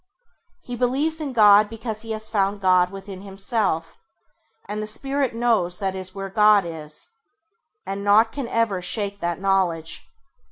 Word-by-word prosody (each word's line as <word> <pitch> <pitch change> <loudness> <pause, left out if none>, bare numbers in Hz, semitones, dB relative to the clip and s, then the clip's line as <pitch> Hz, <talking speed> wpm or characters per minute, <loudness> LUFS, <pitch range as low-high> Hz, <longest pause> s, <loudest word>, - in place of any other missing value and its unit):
He 245 - -6
believes 275 +7 0
in 290 -3 -3
God 210 -3 +6
because 225 -1 -6
he 225 - -10
has 215 0 -4
found 205 -2 0
God 185 -2 +3
within 195 0 -9
himself, 195 -4 -2 0.7
and 210 +1 -4
the 215 - -4
Spirit 270 +2 -1
knows 225 -7 +1
that 195 -1 -2
is 185 0 -4
where 195 0 -5
God 210 0 +4
is, 155 -2 -7 0.8
and 195 +1 -4
naught 215 +3 +4
can 275 -4 -5
ever 230 -6 0
shake 200 +2 -1
that 170 -1 -2
knowledge. 185 -5 0
205 Hz, 155 wpm, -23 LUFS, 190-225 Hz, 0.8 s, God